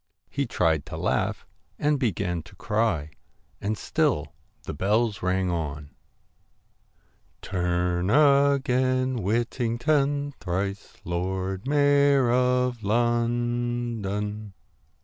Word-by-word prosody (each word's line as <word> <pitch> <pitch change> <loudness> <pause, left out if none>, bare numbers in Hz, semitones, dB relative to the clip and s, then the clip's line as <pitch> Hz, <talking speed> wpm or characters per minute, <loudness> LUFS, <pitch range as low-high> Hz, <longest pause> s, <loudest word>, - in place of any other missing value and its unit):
He 140 -2 -1
tried 80 -8 +1
to - - -6
laugh - - -1 0.3
and 150 -1 +1
began 95 - -1
to - - -18
cry. 105 -7 -1 0.5
And 105 +2 -1
still 125 - 0 0.3
the - - -5
bells 105 +6 +1
rang 90 0 0
on 75 -3 -4 1.5
'Turn 90 0 0
again, 130 -2 +3
Whittington, 135 - 0
Thrice 100 +2 -4
Lord 95 +4 -3
Mayor 140 -3 +4
of 125 -1 +1
London.' 120 -2 -1
115 Hz, 90 wpm, -26 LUFS, 95-130 Hz, 1.5 s, Mayor